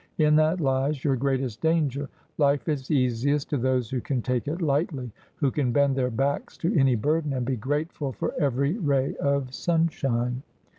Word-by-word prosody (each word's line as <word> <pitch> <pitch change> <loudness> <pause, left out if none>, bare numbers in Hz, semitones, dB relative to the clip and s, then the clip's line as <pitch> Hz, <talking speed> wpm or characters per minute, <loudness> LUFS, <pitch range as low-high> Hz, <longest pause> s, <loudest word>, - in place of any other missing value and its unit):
In 150 -1 +4
that 155 +3 +3
lies 135 -1 0
your 140 -3 +2
greatest 130 -3 -1
danger. 145 -4 +1 0.3
Life 140 0 +2
is 140 -4 -2
easiest 140 +1 +1
to 145 - +1
those 125 -2 0
who 130 -2 -1
can 125 -2 -2
take 125 +1 -1
it 160 +4 -2
lightly 145 -5 -1
— - - -35
who 140 -4 +2
can 130 -4 0
bend 140 +1 +3
their 130 -2 +1
backs 135 +4 -2
to 175 +6 -1
any 135 -5 +4
burden, 150 +5 0
and 125 -2 -2
be 130 +1 0
grateful 145 +4 -2
for 115 - -3
every 140 - +1
ray 140 -6 +1
of 140 -2 0
sunshine.' 135 -7 0
140 Hz, 185 wpm, -26 LUFS, 130-150 Hz, 0.3 s, In